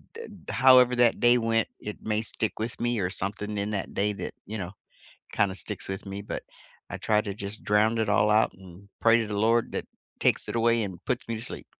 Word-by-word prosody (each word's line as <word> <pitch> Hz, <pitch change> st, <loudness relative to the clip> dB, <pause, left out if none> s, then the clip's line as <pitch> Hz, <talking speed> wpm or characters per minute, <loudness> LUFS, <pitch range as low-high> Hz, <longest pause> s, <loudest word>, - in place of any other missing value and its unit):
d 460 Hz, -, -7 dB, 0.3 s
however 130 Hz, -2 st, +6 dB
that 120 Hz, -1 st, +3 dB
day 120 Hz, +1 st, +6 dB
went, 115 Hz, -1 st, +1 dB
it 105 Hz, -, -6 dB
may 110 Hz, 0 st, 0 dB
stick 110 Hz, -1 st, -3 dB
with 115 Hz, +1 st, -4 dB
me 120 Hz, -1 st, 0 dB
or 90 Hz, -1 st, -1 dB
something 105 Hz, +2 st, -3 dB
in 100 Hz, +1 st, -1 dB
that 100 Hz, -2 st, -3 dB
day 105 Hz, +1 st, +2 dB
that, -, -, -6 dB
you 110 Hz, +1 st, -5 dB
know, 90 Hz, -2 st, -5 dB, 0.6 s
kinda 100 Hz, -2 st, +1 dB
sticks 95 Hz, -, -4 dB
with 95 Hz, +1 st, -5 dB
me, 100 Hz, +1 st, -6 dB
but -, -, -5 dB, 0.5 s
I -, -, -4 dB
try 105 Hz, -1 st, +2 dB
to 100 Hz, -2 st, -5 dB
just 100 Hz, +1 st, -6 dB
drowned 110 Hz, +2 st, +3 dB
it 110 Hz, -, 0 dB
all 105 Hz, +1 st, +3 dB
out 110 Hz, +1 st, +3 dB
and 95 Hz, +1 st, -15 dB
pray 115 Hz, 0 st, +5 dB
to 110 Hz, -, -2 dB
the 105 Hz, -1 st, -3 dB
Lord 115 Hz, +2 st, +2 dB
that -, -, -3 dB, 0.4 s
takes -, -, +2 dB
it -, -, -3 dB
away 115 Hz, -1 st, +2 dB
and 95 Hz, -3 st, -8 dB
puts 125 Hz, -1 st, -2 dB
me 115 Hz, -, -2 dB
to 110 Hz, -, -6 dB
sleep. -, -, -5 dB
105 Hz, 230 wpm, -27 LUFS, 100-115 Hz, 0.6 s, however